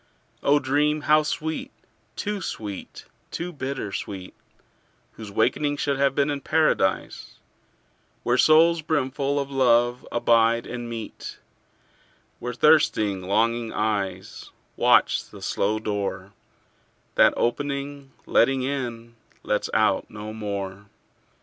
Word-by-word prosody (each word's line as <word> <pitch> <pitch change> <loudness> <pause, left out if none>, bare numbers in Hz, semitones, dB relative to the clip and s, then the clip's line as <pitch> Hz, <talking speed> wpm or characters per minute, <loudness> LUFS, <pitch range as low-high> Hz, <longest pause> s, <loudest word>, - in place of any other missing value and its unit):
O 145 +1 +4
dream 145 +2 +1
how 155 +1 +4
sweet, 155 +1 -3 0.5
too 205 -1 -3
sweet, 105 - -6 0.2
too 175 +1 -5
bitter 130 -7 -4
sweet, 95 -2 -6 0.8
Whose 110 -2 -10
wakening 130 +8 +1
should 140 -1 -1
have 140 -1 +2
been 145 +1 +2
in 140 -1 -3
Paradise, 155 -13 0 0.9
Where 120 +1 +1
souls 165 +1 +5
brimful 140 -2 -1
of 140 0 -4
love 120 -2 +2
abide 115 0 +3
and 120 -1 -6
meet; 115 -2 -7 1.0
Where 120 +1 -4
thirsting 110 -10 +3
longing 115 +4 0
eyes 100 -4 -3 0.3
Watch - - +3
the - - -12
slow 105 +2 0
door 100 -2 -4 0.8
That - - +5
opening, 140 +2 -2
letting 130 +2 +3
in, 120 -4 -4 0.3
lets 105 - -1
out 110 -3 +1
no 105 0 -7
more. 100 -2 -5
120 Hz, 110 wpm, -24 LUFS, 110-145 Hz, 1.0 s, souls